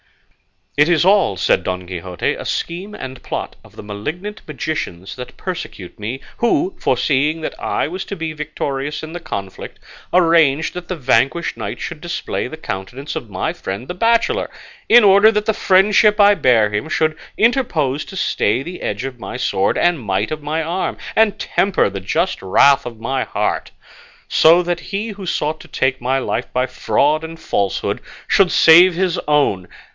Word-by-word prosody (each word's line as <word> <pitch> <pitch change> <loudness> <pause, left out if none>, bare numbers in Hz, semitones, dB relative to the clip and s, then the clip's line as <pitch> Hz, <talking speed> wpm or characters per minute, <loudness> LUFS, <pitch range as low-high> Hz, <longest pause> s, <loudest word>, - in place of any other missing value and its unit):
"It 145 +1 +5
is 170 -1 +3
all," 190 - +3
said - - +2
Don 90 0 -3
Quixote, 90 -1 -3
"a - - -8
scheme 185 +5 -4
and 130 -1 -8
plot - - -5
of - - -19
the - - -9
malignant 155 - -6
magicians 145 - -4
that 125 -1 -9
persecute 165 - -7
me, 115 +6 -5 0.2
who, 310 +10 +1
foreseeing 150 +3 +1
that - - -4
I - - -1
was 185 +4 -5
to 200 - -5
be 160 -3 -4
victorious 150 -1 -4
in 160 +1 -7
the 175 - -5
conflict, 100 - -7 0.3
arranged 165 -4 +3
that 180 -1 -7
the 185 - -3
vanquished 140 +3 +1
knight - - -5
should 160 -1 -6
display 175 0 -3
the 160 - -8
countenance 125 +3 -6
of 115 - -5
my 95 -2 -2
friend 100 +7 -6
the - - -4
bachelor, 230 - +1 0.4
in 240 0 +8
order 200 +2 +7
that 210 -1 -1
the 220 - +2
friendship 210 +2 +4
I 205 0 +7
bear 115 - +3
him 105 +9 -2
should 155 0 +1 0.2
interpose 165 - +1
to - - -10
stay 125 - 0
the 180 +4 -8
edge 105 +4 -3
of 130 -2 -6
my 100 - -6
sword 95 - 0
and 175 -3 +2
might 105 0 -2
of 155 0 -4
my 155 +2 -2
arm, 175 +4 -2 0.2
and 220 -2 +3
temper 190 - +1
the 100 - -5
just 165 - -1
wrath 130 +8 +4
of 115 -2 -9
my 130 +3 -1
heart; - - -2 0.6
so 170 +3 +5
that 175 -1 -2
he 200 +6 -4
who 200 -3 -8
sought 155 -1 -1
to - - -13
take 130 -1 -1
my 130 +2 +1
life 135 - -3
by 125 0 +1
fraud 150 +4 +1
and 160 0 -8
falsehood 100 - -1 0.3
should 190 -2 +4
save 175 +2 +7
his 185 -1 0
own. 140 -12 +2
155 Hz, 180 wpm, -19 LUFS, 125-185 Hz, 0.6 s, in